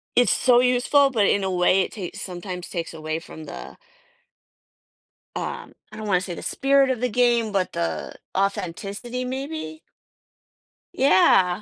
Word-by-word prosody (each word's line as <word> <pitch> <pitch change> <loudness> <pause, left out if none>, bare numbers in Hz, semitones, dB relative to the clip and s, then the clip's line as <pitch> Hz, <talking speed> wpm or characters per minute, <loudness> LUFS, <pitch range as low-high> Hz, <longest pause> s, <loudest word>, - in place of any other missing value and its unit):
It's 245 -4 +4
so 245 -2 +4
useful, 250 +3 +3
but 225 -6 +2
in 200 - +2
a 190 - -1
way, 180 +1 +3
it - - -3
takes 185 -5 -7
sometimes 180 -1 -6
takes 170 -2 -4
away 155 0 -4
from 160 -1 -11
the - - -9 1.6
um, - - -5 0.2
I 215 - -10
don't 215 -1 -6
want 185 -3 +3
to - - -5
say 175 - -5
the - - -8
spirit 275 0 +2
of 250 -2 -1
the 250 - +1
game, 240 -2 +2
but 190 -2 -1
the 80 -2 -3 0.2
authenticity, 200 +6 -2
maybe? 260 - -5 1.1
Yeah, 185 -6 +4
200 Hz, 155 wpm, -23 LUFS, 180-250 Hz, 1.6 s, It's